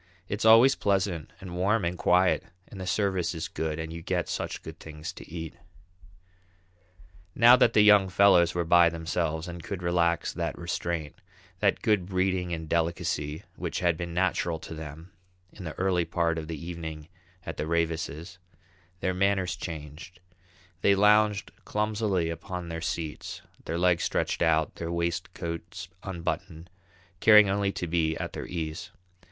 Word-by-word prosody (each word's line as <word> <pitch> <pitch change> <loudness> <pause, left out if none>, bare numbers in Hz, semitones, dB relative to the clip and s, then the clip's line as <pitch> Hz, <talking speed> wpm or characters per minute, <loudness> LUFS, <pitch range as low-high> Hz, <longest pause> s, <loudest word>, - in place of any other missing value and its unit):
It's 100 +3 -3
always 115 +4 +8
pleasant 95 - -1
and 90 -2 -8
warm 100 +3 +1
and 85 +1 -1
quiet 90 +1 +3 0.3
and 95 - -9
the 90 - -5
service 95 -3 0
is 80 0 -3
good 80 -1 -3
and 80 0 -5
you 85 - -7
get 90 0 -1
such - - -4
good - - -9
things 75 -1 -8
to - - -12
eat." 80 -2 -6 1.8
Now 120 +2 +8
that 115 - +4
the 105 - +6
young 105 -2 +6
fellows 90 -2 +5
were 85 -1 0
by 85 0 +6
themselves, 80 -1 -2
and 85 0 -7
could 95 -3 -5
relax 85 -1 +1
that - - -3
restraint, 85 -3 -4 0.4
that - - +1
good 105 -5 +2
breeding 95 -1 0
and 80 -1 -4
delicacy 80 -2 -1
which - - -3
had 85 -2 +2
been 85 +1 -5
natural 85 -1 0
to - - -8
them 80 +3 -9 0.4
in 95 - -10
the 80 - -5
early 90 -2 +1
part 85 -2 0
of 80 - -7
the 80 -1 -5
evening 80 -2 -7 0.4
at 85 - -6
the 75 - -3
Ravises', 85 0 -2 0.6
their 95 - 0
manners 95 -2 +1
changed: 80 0 -8 0.6
they 100 - +4
lounged 105 -1 +3
clumsily 105 -5 0
upon 90 +1 -6
their 85 0 -5
seats, 80 -2 -4 0.2
their 85 - -2
legs 90 -1 +2
stretched - - -1
out, 80 -2 +2
their 85 0 -4
waistcoats 85 0 -4
unbuttoned, 85 -2 -5 0.5
caring 105 -1 +7
only 100 0 +1
to - - -3
be 80 -1 0
at - - -5
their - - -6
ease. 80 -1 -5
85 Hz, 160 wpm, -28 LUFS, 80-95 Hz, 1.8 s, always